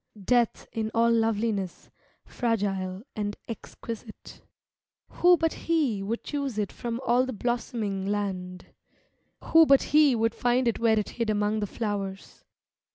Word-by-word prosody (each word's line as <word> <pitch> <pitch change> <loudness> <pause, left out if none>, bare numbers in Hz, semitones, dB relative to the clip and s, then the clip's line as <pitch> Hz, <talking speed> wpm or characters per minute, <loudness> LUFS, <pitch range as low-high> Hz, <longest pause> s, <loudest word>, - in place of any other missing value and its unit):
Death 235 +3 +1
in 220 -1 -2
all 230 +1 +4
loveliness, 225 -4 -1 0.3
fragile 195 -5 -2
and 205 -1 -3
exquisite, 225 0 -9 0.7
Who 355 0 +4
but 325 0 0
he 295 -12 0
would 220 +4 -3
choose 280 -6 -3
it 210 -2 -1
from 235 0 -4
all 245 +1 +4
the 260 - -3
blossom 240 +1 -2
ing 195 -1 -2
land? 185 -3 -3 0.8
Who 325 -1 +6
but 275 -1 +6
he 300 -4 +6
would 225 0 +1
find 245 +1 +1
it 235 - 0
where 225 -1 +3
it 210 - -1
hid 230 -2 -3
among 210 0 +1
the 205 - -2
flowers? 200 -3 -5
225 Hz, 145 wpm, -27 LUFS, 205-245 Hz, 0.8 s, Who